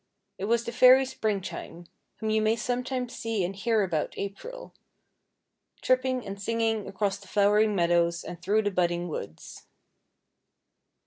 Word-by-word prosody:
It 195 - -2
was 235 +2 +2
the 235 - -5
fairy 255 +2 +7
Springtime, 200 -7 -4 0.3
whom 220 0 -3
you 220 0 +2
may 220 +1 +2
sometimes 250 +1 -3
see 225 -5 -2
and 185 +3 -3
hear 220 +1 +1
about 165 -5 -2
April, 465 - -7 1.1
tripping 255 0 +1
and 200 0 -7
singing 225 0 0
across 195 0 -2
the 200 - -16
flowering 210 +1 +3
meadows 170 -1 +2
and 175 -1 -8
through 210 +4 +2
the 205 - 0
budding 175 -1 0
woods. 90 - -8
210 Hz, 140 wpm, -27 LUFS, 190-235 Hz, 1.1 s, fairy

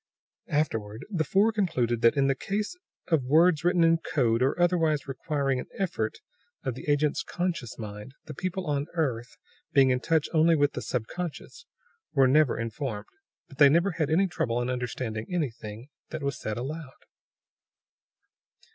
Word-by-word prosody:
(Afterward 115 -7 -2
the 170 -5 +1
four 200 +8 +3
concluded 125 - 0
that, 115 +5 +4
in 140 - +4
the 135 - +3
case 205 - -3 0.3
of 160 -4 +3
words 160 +4 +4
written 175 -1 +3
in 165 0 +4
code 120 -7 +1
or 135 +6 +1
otherwise 165 -5 +2
requiring 135 -1 -1
an - - -6
effort 160 - -2 0.5
of 130 - -2
the 130 - -7
agent's 145 0 +2
conscious 170 -10 -3
mind, 105 +3 -8
the 155 - -7
people 185 +4 -3
on 145 -2 0
the - - -22
earth, 125 -7 -2 0.4
being 135 -2 +5
in 125 - +1
touch 160 +2 +1
only 165 +1 +5
with 145 -1 +2
the - - -4
subconscious, 175 - -5 0.5
were 135 -4 +5
never 145 0 +4
informed. 115 -2 -4 0.4
But 135 - -16
they 145 -2 +9
never 170 +7 +3
had 160 -3 -1
any 175 +5 +3
trouble 120 -10 -1
in 120 +1 -1
understanding 115 -3 -3
anything 120 - -4 0.2
that 155 -2 -5
was 140 0 -1
said 110 0 -4
aloud.) 140 +2 -7
145 Hz, 165 wpm, -27 LUFS, 125-165 Hz, 0.5 s, they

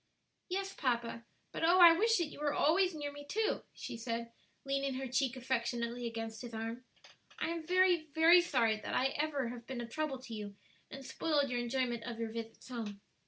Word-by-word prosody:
"Yes, 390 +1 -2
papa; 235 -3 -1 0.3
but - - -4
oh 345 +3 +5
I 345 -2 +11
wish 450 +5 +3
that 345 - +1
you - - -11
were 295 -1 0
always 360 +3 +3
near 290 -1 -4
me 290 0 -9
too," 430 +9 0
she - - -7
said, 230 0 -4 0.3
leaning 275 -1 0
her 265 +1 -3
cheek 260 0 0
affectionately 240 -1 -2
against 225 -1 -5
his 235 -2 -7
arm. 225 +3 -4 0.5
"I - - -1
am 335 -1 -4
very, 360 -3 +4
very 335 +2 +7
sorry 235 -10 +2
that 260 +5 0
ever 295 -3 0
I - - -3
have 240 -1 -9
been 260 -2 -4
a 240 - -4
trouble 305 +1 -2
to 255 -2 -10
you 205 -2 -6 0.3
and 270 0 -9
spoiled 285 0 0
your 245 - 0
enjoyment 240 -1 -1
of 235 -2 -5
your 225 -1 -3
visits 225 0 -7
home." 225 -5 -5
260 Hz, 200 wpm, -34 LUFS, 235-310 Hz, 0.5 s, I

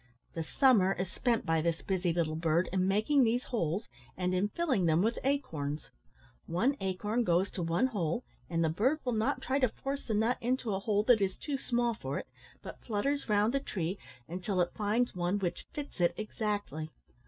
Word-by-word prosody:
The 165 - -2
summer 200 - +4
is 185 -1 -4
spent 235 -1 0
by 165 -1 +2
this 165 0 -1
busy 185 -2 0
little 165 -2 0
bird 165 +2 +2
in 185 -1 +2
making 215 +8 +3
these 240 +2 +2
holes 200 -3 -1 0.3
and 180 0 0
in 185 +3 +2
filling 260 - 0
them 160 +3 +3
with 230 +2 +1
acorns. 160 - -2 0.6
One 235 +12 +1
acorn 205 +5 0
goes 180 -1 +2
to 185 - -4
one 170 +8 +2
hole, 205 -3 -1 0.3
and 165 -1 +1
the 160 - +2
bird 250 - +1
will 250 - +1
not 225 +6 0
try 270 +1 +1
to 255 -3 +3
force 275 +5 -4
the 220 - 0
nut 225 +4 +2
into 245 -2 0
a 190 - 0
hole 205 0 +1
that 225 -2 +5
is 190 -1 0
too 290 - -3
small 240 -2 0
for 225 - -4
it, - - -4 0.4
but - - -9
flutters 265 +5 -1
round 210 +3 +3
the 275 - +2
tree 190 -7 -3 0.3
until 185 +3 -2
it 175 -1 +1
finds 220 +3 +1
one 180 +2 0
which 185 -4 -3
fits 290 -10 -6
it 175 - +3
exactly. 205 -7 -3
205 Hz, 200 wpm, -31 LUFS, 175-245 Hz, 0.6 s, that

